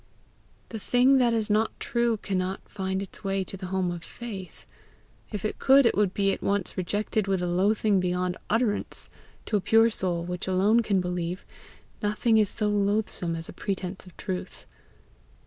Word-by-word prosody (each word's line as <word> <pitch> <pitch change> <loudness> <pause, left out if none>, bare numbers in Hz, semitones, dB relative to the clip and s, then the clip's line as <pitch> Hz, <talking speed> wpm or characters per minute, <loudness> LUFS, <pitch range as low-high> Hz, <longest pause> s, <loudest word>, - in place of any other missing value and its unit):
The 220 - -5
thing 255 +5 +4
that 245 -2 +4
is 225 -2 0
not 215 +1 +1
true 235 -4 +1
cannot 190 -1 -3
find 190 -1 -3
its 195 - -9
way 195 -1 0
to 190 - -7
the 190 -1 -6
home 185 -1 0
of 170 -1 -6
faith; 200 -7 -8 0.7
if 210 -2 -4
it 215 - -3
could, 270 0 +6
it - - +3
would 205 -2 +2
be 195 0 +1
at - - -6
once 200 -2 -1
rejected 205 +3 -1
with 195 -1 +1
a 180 - -1
loathing 200 +3 +2
beyond 180 0 0
utterance; 225 -1 0 0.3
to 215 - +1
a - - -2
pure 225 +4 +4
soul, 175 -4 0
which 180 +1 -4
alone 195 +5 +4
can 205 -5 +1
believe, 180 0 -3 0.6
nothing 220 +2 +2
is 210 -2 +3
so 210 - -1
loathsome 205 -4 0
as 165 0 -5
a - - -9
pretence 190 0 -4
of 180 - -16
truth. 185 -1 -5
200 Hz, 180 wpm, -27 LUFS, 185-215 Hz, 0.7 s, could